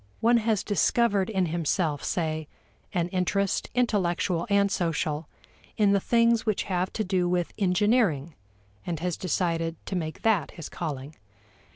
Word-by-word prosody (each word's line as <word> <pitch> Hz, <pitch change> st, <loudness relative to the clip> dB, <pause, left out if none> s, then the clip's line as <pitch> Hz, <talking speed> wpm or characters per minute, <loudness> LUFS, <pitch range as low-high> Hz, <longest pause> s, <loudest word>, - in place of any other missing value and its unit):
One 235 Hz, +1 st, +4 dB
has 220 Hz, -3 st, +1 dB
discovered 205 Hz, -1 st, +2 dB
in 190 Hz, -4 st, +1 dB
himself, 160 Hz, -2 st, -1 dB
say, 155 Hz, -3 st, -2 dB, 0.4 s
an 175 Hz, -3 st, 0 dB
interest, 190 Hz, +2 st, 0 dB
intellectual 185 Hz, -6 st, +1 dB
and 200 Hz, -1 st, +3 dB
social, 160 Hz, -4 st, -1 dB, 0.5 s
in 205 Hz, -2 st, +4 dB
the 200 Hz, -, +4 dB
things 230 Hz, +2 st, +3 dB
which 215 Hz, -3 st, 0 dB
have 185 Hz, -1 st, -1 dB
to 215 Hz, -, -1 dB
do 180 Hz, -3 st, 0 dB
with 175 Hz, -1 st, -1 dB
engineering 190 Hz, -, +2 dB, 0.5 s
and 170 Hz, -3 st, -3 dB
has 175 Hz, 0 st, -1 dB
decided 165 Hz, -2 st, -1 dB
to 190 Hz, -, -4 dB
make 160 Hz, -3 st, -4 dB
that 210 Hz, -9 st, +2 dB
his 165 Hz, -, -7 dB
calling. 145 Hz, -3 st, -5 dB
180 Hz, 145 wpm, -27 LUFS, 165-205 Hz, 0.5 s, One